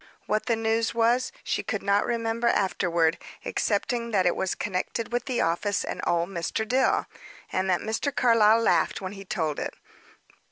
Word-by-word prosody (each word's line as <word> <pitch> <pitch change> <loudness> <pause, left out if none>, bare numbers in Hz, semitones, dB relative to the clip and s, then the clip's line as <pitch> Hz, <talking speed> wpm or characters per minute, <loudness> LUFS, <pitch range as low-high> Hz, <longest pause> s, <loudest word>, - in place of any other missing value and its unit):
What 215 +3 -1
the 235 - +3
news 225 +1 0
was, 235 +2 +2
she - - -1
could 215 - -3
not 200 +2 +2
remember 230 0 -1
afterward, 170 -6 +1 0.3
excepting 235 +3 -1
that 195 -5 +2
it 175 - +3
was 190 - -1
connected 210 +4 -3
with 245 - 0
the 255 -3 0
office 185 +5 0
and - - -4
old 170 +1 +1
Mr. 195 +4 -2
Dill, 260 +3 +2 0.5
and 190 +1 0
that 180 - +2
Mr. 225 +6 -1
Carlyle 230 -3 +4
laughed 230 - +2
when 185 -1 -5
he 195 -1 -9
told 155 -5 -2
it. - - -4
215 Hz, 170 wpm, -26 LUFS, 185-230 Hz, 0.5 s, Carlyle